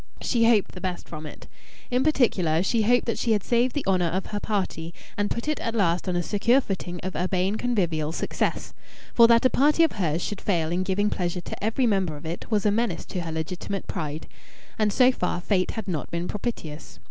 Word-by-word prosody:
She 230 -2 +2
hoped 215 -4 +3
the 180 - -10
best 185 -2 -4
from 155 -1 -7
it. - - -11 0.5
In 250 +1 +2
particular, 185 - +2
she 225 +3 +1
hoped 245 +3 +3
that 230 - -2
she 230 - +2
had 205 -3 0
saved 240 +1 +1
the 290 - -2
honour 185 -2 +2
of 185 +3 -2
her 205 - -4
party 185 -6 -3 0.2
and 205 0 0
put 235 +5 -3
it 305 -2 0
at 230 - -3
last 180 -3 +1
on 180 - 0
a 175 - 0
secure 230 +8 +3
footing 185 -7 -4
of 185 0 -4
urbane 185 +2 0
convivial 175 -11 0
success. - - -2 0.4
For 235 -1 +7
that 230 +1 +5
a 255 - +5
party 300 +4 +4
of 325 - +3
hers 170 -5 -1
should 205 - -4
fail 165 -5 0
in 175 +2 0
giving 200 +2 0
pleasure 175 -1 -2
to 175 - -8
every 225 +4 +1
member 190 -8 +1
of 145 - -12
it 165 +2 -5
was 215 -3 +1
a 210 - +4
menace 215 -4 -1
to 180 - -4
her 165 -1 -5
legitimate 175 +4 -4
pride. 155 0 -4 0.5
And 215 -1 +3
so 255 +4 +5
far 180 -7 -2
fate 185 0 +1
had 220 - -4
not 165 -6 -3
been 170 +1 -3
propitious. 185 -8 -5
195 Hz, 220 wpm, -25 LUFS, 175-230 Hz, 0.5 s, For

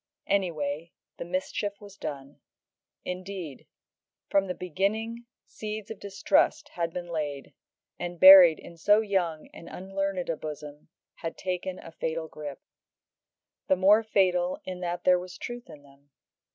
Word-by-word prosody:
Anyway, 165 -4 -1 0.3
the - - -4
mischief 190 +3 -3
was 205 -1 -13
done. 140 -5 -7 0.7
Indeed, 180 -5 -6 0.6
from 195 -1 +3
the 180 - -3
beginning 215 +7 -2 0.2
seeds 215 -1 -6
of 220 - -7
distrust 295 +9 +1
had 170 - -3
been 175 +1 -5
laid, 150 -4 -4 0.5
and, 175 -1 -5
buried 185 -3 +10
in 170 - -13
so 205 +6 +4
young 180 -7 -1
and 170 - -11
unlearned 195 -1 -3
a 165 - 0
bosom, 150 -1 -8 0.3
had 165 - -5
taken 185 0 -3
a 165 - -11
fatal 160 0 -3
grip. 150 -2 -8 1.0
The 190 - +4
more 200 +4 +5
fatal 185 -4 +1
in 185 -1 -5
that 175 0 -3
there 180 -1 +5
was 180 0 -9
truth 240 -3 -7
in 150 -3 -12
them. 140 0 -22
180 Hz, 140 wpm, -28 LUFS, 160-195 Hz, 1.0 s, buried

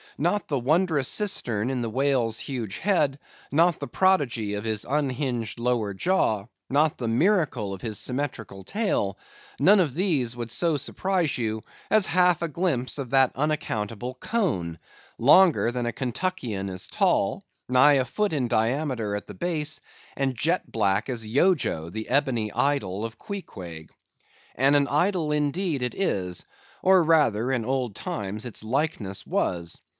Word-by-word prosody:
Not 175 +7 0
the 140 -3 0
wondrous 155 +1 +2
cistern 125 - -1
in 130 -2 -2
the 115 - -2
whale's 125 -2 +1
huge 115 -7 -4
head; 155 -8 +2 0.3
not 170 +3 +3
the - - -4
prodigy 135 - +1
of 105 - -4
his 110 -2 -1
unhinged 130 -5 -1
lower 115 -5 0
jaw; 110 - +1 0.2
not 150 +3 +2
the 120 - -2
miracle 130 - +1
of 95 - -8
his 110 -2 -3
symmetrical 125 -7 -3
tail; 105 - -1 0.4
none 195 +9 +6
of 150 -8 +1
these 150 - +1
would 120 -2 -5
so 160 +5 +1
surprise 180 0 -1
you, 110 -2 -2 0.3
as 215 -3 +4
half 180 -1 +3
a - - 0
glimpse 150 -6 -1
of 135 -3 -4
that 135 -1 +5
unaccountable 125 -5 -2
cone,—longer 140 - +2
than 120 0 -2
a 120 - -2
Kentuckian 125 - -3
is 90 -1 -4
tall, - - +1 0.3
nigh 130 +3 +6
a 135 -2 +3
foot 205 - -1
in 135 -5 0
diameter 115 -2 0
at 105 - -5
the - - -9
base, 155 -3 -3 0.3
and 135 -2 -1
jet 165 +8 0
black 105 +1 +1
as 115 -3 -3
Yojo, 125 - +1
the 110 +4 -6
ebony 120 -7 +1
idol 115 -8 0
of 115 -1 -7
Queequeg. 90 - -8 0.6
And 135 +3 +4
an 140 -1 +4
idol, 165 +1 +1
indeed, 150 +1 0
it 125 -1 -2
is; 90 - -2 0.4
or, 185 -1 +6
rather, 135 -8 +3
in 120 -4 0
old 125 -4 -1
times, 105 +3 -4
its 115 -3 -5
likeness 115 -5 -2
was. 85 -1 -2
130 Hz, 150 wpm, -25 LUFS, 110-160 Hz, 0.6 s, none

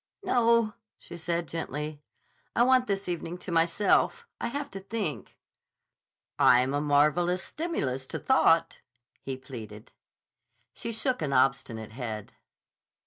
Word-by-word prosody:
"No," 230 -3 +3 0.2
she - - -11
said 170 0 -2
gently. 150 -2 -4 0.5
"I 240 - +5
want 255 0 +4
this 200 -1 -2
evening 175 0 -3
to 180 - -7
myself. 170 - +2
I - - -2
have 285 +3 -4
to 195 - -6
think." 195 -5 -4 1.0
"I'm 125 +2 +5
a 145 - +1
marvelous 150 +5 +2
stimulus 135 - -3
to - - -4
thought," 170 -11 +3 0.4
he 135 -1 -4
pleaded. 110 -5 -10 0.8
She 230 - -5
shook 250 +1 -1
an 145 -3 -1
obstinate 130 -4 +1
head. 110 -3 -6
165 Hz, 125 wpm, -28 LUFS, 135-215 Hz, 1.0 s, I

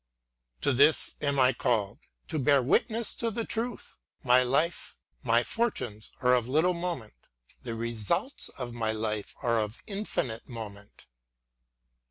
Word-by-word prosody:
To 140 - +2
this 145 +5 +4
am 140 -1 0
I 130 -1 +5
called, 110 -5 0 0.3
to 155 - -1
bear 140 -1 +4
witness 225 - +1
to 230 - -2
the 225 +1 -3
Truth; 235 +2 -3 0.2
my 125 -1 +6
life, 140 +7 0 0.3
my - - +3
fortunes 125 - -2
are 125 0 +5
of 120 -2 +2
little 160 +7 +3
moment, 170 -10 -4 0.3
— - - -33
the 115 -2 -3
results 115 - -1
of 125 -2 -6
my 110 -2 -1
life 110 -1 -3
are 115 -2 +2
of 105 +1 -4
infinite 195 - -3
moment. 105 -4 -9
125 Hz, 145 wpm, -29 LUFS, 115-165 Hz, 0.3 s, my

